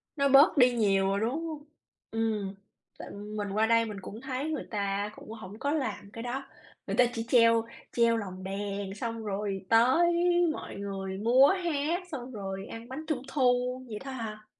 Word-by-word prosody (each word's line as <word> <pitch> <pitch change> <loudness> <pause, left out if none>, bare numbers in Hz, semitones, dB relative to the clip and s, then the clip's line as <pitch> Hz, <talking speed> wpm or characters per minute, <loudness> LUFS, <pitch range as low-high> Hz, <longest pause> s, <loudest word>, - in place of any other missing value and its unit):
Nó 280 -2 +2
bớt 275 +3 +7
đi 250 -1 +7
nhiều 195 -4 +2
rồi, 195 +1 +1
đúng 270 +10 -1
hông? 305 -2 -6 0.5
Ừm, 215 -3 -1 0.4
tại - - -8
mình 205 0 -5
qua 215 +2 +2
đây 230 0 +4
mình 210 -2 -6
cũng 220 +5 -8
thấy 265 +3 -3
người 300 - -4
ta 200 0 -1
cũng - - -13
hổng 215 -1 -9
có 285 +1 0
làm 225 -9 -3
cái 230 +2 -7
đó, 255 +3 -3 0.4
người - - -1
ta 250 - +7
chỉ 230 -1 -3
treo 230 -2 +5 0.3
treo 230 -1 +3
lồng 185 -3 -6
đèn 200 0 -4
xong 230 +1 -4
rồi 200 -1 -3
tới 260 +10 +5 0.4
mọi - - -7
người 195 -1 -4
múa 245 +6 +6 0.2
hát, 330 +2 0
xong 255 -3 -6
rồi 195 -3 -5
ăn 230 +1 -9
bánh 305 +5 -6
Trung 305 -6 -1
thu 250 -2 +1
vậy 210 -2 -6
thôi 270 -1 -6
à. 215 -1 -6
225 Hz, 190 wpm, -29 LUFS, 200-260 Hz, 0.5 s, bớt